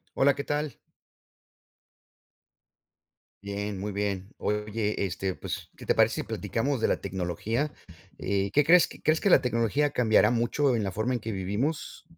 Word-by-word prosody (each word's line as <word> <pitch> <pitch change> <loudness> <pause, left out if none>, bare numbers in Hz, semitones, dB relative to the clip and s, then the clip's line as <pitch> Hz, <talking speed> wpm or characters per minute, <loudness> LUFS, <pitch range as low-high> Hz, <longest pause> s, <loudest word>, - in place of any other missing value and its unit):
Hola, 140 0 +4
¿qué 140 - -4
tal? 150 -2 -2 2.7
Bien, 100 0 -4
muy 105 +2 -3
bien. 100 -1 -2
Oye, 105 0 -1
este, 95 0 -2
pues, - - -6
¿qué - - -12
te - - +3
parece - - +4
si - - -6
platicamos 135 +3 -2
de - - +2
la - - 0
tecnología? 100 - -2 0.5
Eh, 100 0 -1
¿qué 145 - +5
crees? 175 +4 +6 0.2
¿Crees 155 +1 +3
que 200 - +2
la 135 - +7
tecnología 125 +3 +1
cambiará 120 -5 +4
mucho 120 +3 +1
en 110 - 0
la 95 - -2
forma 110 +6 -1
en - - -2
que 110 - -4
vivimos? 105 - -3
110 Hz, 160 wpm, -28 LUFS, 100-140 Hz, 2.7 s, la